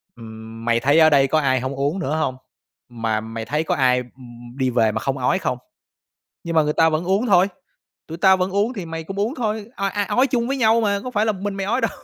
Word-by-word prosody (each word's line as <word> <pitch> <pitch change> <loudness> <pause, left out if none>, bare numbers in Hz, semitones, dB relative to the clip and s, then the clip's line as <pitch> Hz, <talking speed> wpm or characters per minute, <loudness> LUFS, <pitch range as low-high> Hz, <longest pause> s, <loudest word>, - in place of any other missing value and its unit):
ừm, 110 0 -10
mày 115 0 +2
thấy 145 +6 +3
ở 155 - +7
đây 140 -2 +4
có 155 +3 +2
ai 130 -3 +1
hổng 130 +2 -4
uống 145 +7 -1
nữa 155 -3 -2
hông, 155 -5 -1 0.5
mà 115 -2 -2
mày 110 0 -6
thấy 150 +6 -1
có - - -1
ai 125 -1 +2 0.5
đi 130 -2 0
về 115 -3 +2
mà - - -3
không 135 0 -2
ói 125 - +1
không? 125 - -2 0.9
Nhưng 165 -1 -4
mà 160 - +5
người 150 0 -1
ta 160 +1 +4
vẫn 155 +1 -1
uống 195 +6 +1
thôi, 190 -2 +5 0.6
tụi 165 +1 -8
tao 190 +1 +5
vẫn 185 +1 -1
uống 205 +5 0
thì 185 -5 -6
mày 165 0 -6
cũng 195 +4 -7
uống 225 +7 -1
thôi, 220 -5 -3
o 195 - -1
a, 205 +1 -1
ói 255 +6 +2
chung 240 -2 -1
với 275 - -1
nhau 230 -2 +3
mà, 200 -2 0
có 255 - -4
phải 215 -2 0
là 215 - +2
một 190 - -10
mình 205 -1 -2
mày 195 -1 -3
ói 240 +5 0
đâu." - - 0
160 Hz, 265 wpm, -21 LUFS, 130-205 Hz, 0.9 s, ở